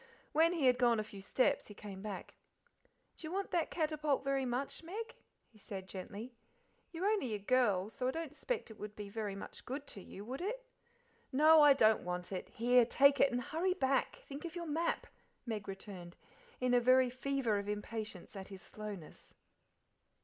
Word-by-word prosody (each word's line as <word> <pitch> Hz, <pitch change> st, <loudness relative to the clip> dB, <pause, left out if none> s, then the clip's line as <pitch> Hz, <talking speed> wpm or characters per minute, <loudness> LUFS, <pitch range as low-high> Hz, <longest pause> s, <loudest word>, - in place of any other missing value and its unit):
When 330 Hz, +3 st, +4 dB
he 320 Hz, -6 st, +1 dB
had 250 Hz, -1 st, +5 dB
gone 240 Hz, -3 st, +4 dB
a -, -, 0 dB
few 205 Hz, -2 st, -10 dB
steps 250 Hz, +6 st, +1 dB
he 210 Hz, -, -11 dB
came 200 Hz, -3 st, -8 dB
back. 205 Hz, -2 st, -6 dB, 0.8 s
"D'ye 315 Hz, -, -6 dB
want 390 Hz, +3 st, -2 dB
that 340 Hz, -2 st, +1 dB
catapult 305 Hz, -3 st, 0 dB
very 275 Hz, -1 st, +1 dB
much, 250 Hz, +3 st, -2 dB
Meg?" 440 Hz, +8 st, -6 dB, 0.3 s
he 220 Hz, -, -22 dB
said 190 Hz, -2 st, -7 dB
gently. 200 Hz, +6 st, -7 dB, 0.6 s
"You're 340 Hz, +3 st, -3 dB
only 400 Hz, -, +1 dB
a -, -, -1 dB
girl, 205 Hz, -3 st, +2 dB
so 250 Hz, -, -2 dB
I -, -, +3 dB
don't 325 Hz, 0 st, -5 dB
'spect 455 Hz, -, -3 dB
it 215 Hz, -, -13 dB
would 210 Hz, 0 st, -7 dB
be 205 Hz, -1 st, -7 dB
very 205 Hz, -2 st, -3 dB
much 195 Hz, -, -8 dB
good 275 Hz, +3 st, -5 dB
to 200 Hz, -, -8 dB
you, 200 Hz, +2 st, -9 dB
would 260 Hz, +6 st, -5 dB
it?" -, -, -3 dB, 0.7 s
"No, 310 Hz, +3 st, +7 dB
I 295 Hz, -1 st, +9 dB
don't 220 Hz, -5 st, +4 dB
want 180 Hz, +1 st, -4 dB
it. 185 Hz, -, -4 dB
Here, 245 Hz, +2 st, +4 dB
take 280 Hz, +4 st, +5 dB
it, 280 Hz, -, +5 dB
and 245 Hz, 0 st, 0 dB
hurry 355 Hz, +8 st, 0 dB
back: 270 Hz, -6 st, 0 dB
think 280 Hz, +1 st, -7 dB
of 340 Hz, 0 st, -6 dB
your 345 Hz, -1 st, -4 dB
map," 325 Hz, +2 st, 0 dB, 0.4 s
Meg 220 Hz, -4 st, -4 dB
returned, 190 Hz, -3 st, -8 dB, 0.4 s
in 250 Hz, 0 st, +1 dB
a 245 Hz, -, +6 dB
very 255 Hz, +1 st, +5 dB
fever 255 Hz, -4 st, 0 dB
of 200 Hz, 0 st, -5 dB
impatience 210 Hz, -2 st, -5 dB
at 190 Hz, -1 st, -7 dB
his 195 Hz, -1 st, -10 dB
slowness. 205 Hz, -7 st, -9 dB
245 Hz, 190 wpm, -35 LUFS, 205-300 Hz, 0.8 s, I